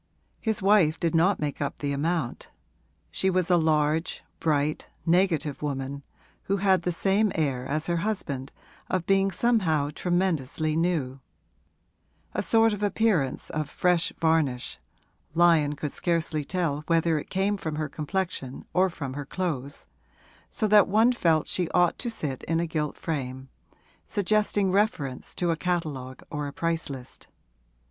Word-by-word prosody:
His 220 -3 -2
wife 190 -6 +4
did 165 -2 0
not 175 +5 +3
make 150 0 -3
up 140 - -2
the 145 -1 -2
amount; 150 -2 -2 0.6
she 190 - 0
was 185 -1 +1
a - - +6
large, 155 0 +1 0.2
bright, 150 -1 0 0.2
negative 165 -5 +2
woman, 140 -1 -3 0.4
who 200 - +1
had 190 -2 +3
the 180 - -1
same 195 +4 +2
air 135 -5 -1
as 155 +3 -1
her 170 0 0
husband 155 -9 -3 0.4
of 185 -2 -1
being 195 +1 +3
somehow 175 -9 +2
tremendously 160 -4 0
new; 160 -6 0 1.1
a - - 0
sort 225 -1 +3
of 205 - -5
appearance 205 -9 +1
of 150 -1 -2
fresh 180 0 +1
varnish 160 -6 +1 0.6
(Lyon 165 -4 +4
could 150 0 -4
scarcely 165 -3 0
tell 160 -3 -1
whether 165 -1 +2
it - - -9
came 195 +2 +1
from 160 -6 -4
her 155 0 -2
complexion 155 -3 -4
or 185 +1 +3
from 140 -6 -6
her 145 +1 -5
clothes), 145 -7 -4 0.6
so 215 - -1
that 210 -1 +6
one 220 +5 +4
felt 165 -9 +2
she 180 -3 -1
ought 175 -1 +3
to 240 - -2
sit 145 - -4
in 165 0 0
a 170 - +1
gilt 155 -2 -2
frame, 130 -4 -4 0.6
suggesting 205 -1 +1
reference 185 -10 -1
to 175 -1 +1
a - - +1
catalogue 155 -8 -3
or 150 -1 -3
a - - -5
price 165 -2 -1
list. 130 -2 -9
165 Hz, 150 wpm, -27 LUFS, 145-185 Hz, 1.1 s, a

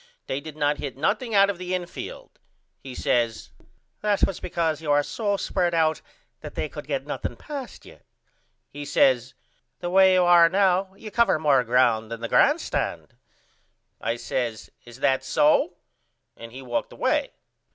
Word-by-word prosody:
they 135 - -3
did 155 0 -10
not 145 0 +1
hit 135 -3 -6
nothing 225 - -1
out 200 0 +6
of 200 -3 -3
the 185 0 -2
infield. 175 -1 -8 0.4
He 130 -2 -10
says 115 -2 -1 0.5
That 205 -1 +2
was 195 - -4
because 160 -3 -2
you 150 -2 -1
are 145 0 +4
so 205 +4 -2
spread 175 -3 -1
out 160 -1 +1 0.4
that - - -10
they - - -2
could - - -9
not - - -28
get - - -2
nothing - - -4
past 280 -4 -8
you. - - -15 0.7
He 145 - -7
says 130 -3 +2 0.4
The 175 0 -4
way 190 0 +6
you 180 - +4
are 175 -1 +6
now 190 0 +1
you 215 +1 -10
cover 235 -5 +3
more 145 -4 +3
ground 115 -2 +2
than 115 0 -6
the 115 - -3
grand - - +4
stand. - - -4 0.9
I 115 - -1
says 120 -2 -4
Is 120 +2 -14
that 130 -1 +2
so? 155 +4 +2 0.6
And 115 0 -11
he 130 +2 -10
walked 120 -2 -3
away. - - -1
155 Hz, 170 wpm, -24 LUFS, 130-185 Hz, 0.9 s, out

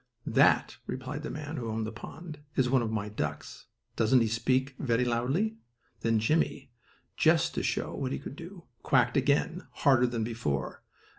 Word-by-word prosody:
"That," - - +3
replied 130 +3 -4
the 150 - -5
man 150 +1 -5
who 115 -3 -3
owned 110 0 -2
the 110 - -4
pond, 155 +7 -9 0.2
"is 130 -2 +3
one 130 -2 +4
of 115 - -1
my 110 -2 -2
ducks. 105 +1 -5 0.3
Doesn't 115 +3 +4
he 115 - +2
speak 130 +4 +1
very 125 -2 +1
loudly?" 135 - 0 0.4
Then 115 -1 +2
Jimmie, 130 +3 0 0.5
just - - +3
to - - -1
show - - -1
what 130 -1 -3
he - - -1
could - - -8
do, 170 +3 -10 0.2
quacked 125 +2 +3
again, 145 +6 +1
harder 130 -3 +3
than 120 -2 -2
before. 90 - -3
125 Hz, 170 wpm, -29 LUFS, 115-145 Hz, 0.5 s, one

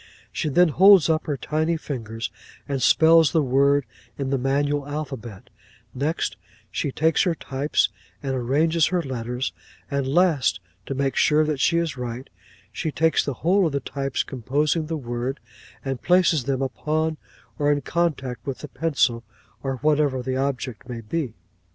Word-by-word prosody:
She 155 - -2
then 175 +4 +4
holds 190 0 +6
up 155 0 -1
her 145 -2 -1
tiny 160 +3 0
fingers, 115 -7 -5 0.4
and 140 -2 -2
spells 160 +1 +5
the 160 - +3
word 140 +1 +3 0.3
in 135 -1 -2
the 135 - +1
manual 140 +2 0
alphabet; 135 -8 -6 0.4
next, 145 +5 -2 0.3
she 140 - -2
takes 160 +4 +2
her 175 -3 +1
types 140 0 0 0.3
and 135 -1 -1
arranges 150 +6 +2
her 180 -2 0
letters; 125 -1 -3 0.4
and 140 -1 0
last, 150 - +2 0.3
to 135 - -3
make 135 -1 0
sure 155 +1 +4
that 150 -3 -2
she 170 +5 +3
is 165 -5 -1
right, 125 +1 -6 0.4
she 155 - -3
takes 160 +2 +2
the 140 - -3
whole 190 +1 +4
of 155 - -4
the 140 - +1
types 135 0 -2
composing 145 +5 -1
the 160 0 -2
word, 120 0 -4 0.5
and 135 -2 -3
places 175 -6 +3
them 135 -1 0
upon 155 +5 -1 0.4
or 145 0 +3
in 145 0 +1
contact 140 -6 -1
with 135 - -2
the 150 - -9
pencil, 135 -7 0 0.4
or 135 -1 -2
whatever 145 -4 +2
the 130 0 -2
object 130 -3 -3
may 120 -2 -5
be." 125 +1 -3
140 Hz, 165 wpm, -24 LUFS, 130-160 Hz, 0.5 s, holds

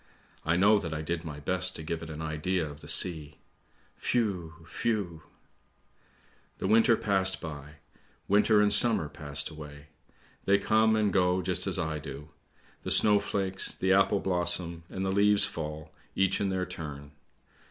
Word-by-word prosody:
I 80 +2 0
know 100 +4 +4
that 80 -5 -5
I 75 - -5
did 85 +1 -3
my 75 -3 -8
best 95 +4 0
to 80 - -7
give 80 +1 -4
it 80 - -8
an 80 0 -7
idea 80 +2 -2
of 75 0 -11
the - - -12
sea. 75 -5 +2 0.6
Whew! 90 -9 -2 0.2
whew! 100 -8 -2 0.5
" - - -38
' - - -35
The - - -5
winter 115 +3 +4
passed 95 -2 0
by; 75 -2 -9 0.5
winter 105 +1 +3
and 105 - +5
summer 115 -10 +5
passed 75 0 -4
away! 75 -1 -12 0.6
They 100 +1 +4
come 110 +2 +2
and 105 -3 0
go 90 -1 +1
just 90 +1 -1
as 95 - +1
I 80 -3 -3
do. 75 +1 -9 0.5
The - - -6
snowflakes, 100 -2 +2
the 95 0 +1
apple 100 +1 +2
blossom, 85 -2 -1
and 95 0 -4
the 95 - -1
leaves 100 +1 +3
fall, 75 -1 -7 0.2
each 95 0 +1
in 100 - 0
their 95 -1 -2
turn. 75 -5 -8
90 Hz, 165 wpm, -28 LUFS, 80-100 Hz, 0.6 s, and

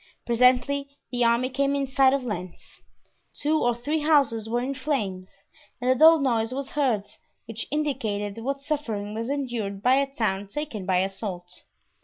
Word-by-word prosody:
Presently 250 +4 +3 0.2
the 245 -1 +1
army 235 +2 +2
came 275 +2 +1
in 280 -1 0
sight 265 0 +4
of 275 -1 0
Lens; 185 -6 -7 0.6
two 310 +2 +1
or 240 -1 +2
three 290 +7 -2
houses 280 -8 +2
were 240 +1 +1
in 260 +3 -2
flames 215 -10 -3 0.5
and 250 +1 +1
a - - +6
dull 320 +5 +7
noise 235 -5 0
was 270 +1 -4
heard 250 -9 +1 0.4
which 225 -1 -6
indicated 230 -9 -2
what 275 +2 -3
suffering 225 -9 -3
was 230 +3 -4
endured 235 -8 -3
by 255 +2 +5
a 275 0 0
town 205 -6 -1
taken 220 -5 -5
by 185 -1 +3
assault. 185 -2 -5
250 Hz, 165 wpm, -25 LUFS, 210-275 Hz, 0.6 s, dull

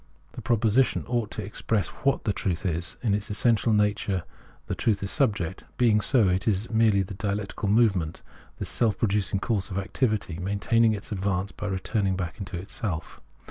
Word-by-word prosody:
The - - -8
proposition 120 +2 +2
ought 120 -3 0
to 105 - -5
ex 105 - -8
press 105 -7 +1
ivhat 140 0 0
the 105 - 0
truth 90 -2 -2
is: 85 -1 -1
in 110 -4 +2
its 105 0 -2
essential 115 +1 +2
nature 105 -3 +1 0.4
the - - -3
truth 105 -3 0
is 100 - -3
subject: 100 - 0
being 110 -4 +4
so, 115 -3 +3
it 90 0 0
is 105 +2 0
merely 110 -3 +4
the 95 - -7
dialectical 100 +1 -2
move 110 -1 +5
ment, 80 -2 -4 0.3
this - - -4
self 115 -4 +1
producing 100 -2 0
course 100 -4 -1
of 95 - -4
activity, 100 -4 -1
maintaining 110 +4 +2
its 105 +1 -6
advance 95 -1 -1
by 105 - -5
returning 95 0 0
back 90 +2 -4
into 95 -2 -5
itself. 90 -1 -5
100 Hz, 180 wpm, -26 LUFS, 95-110 Hz, 0.4 s, move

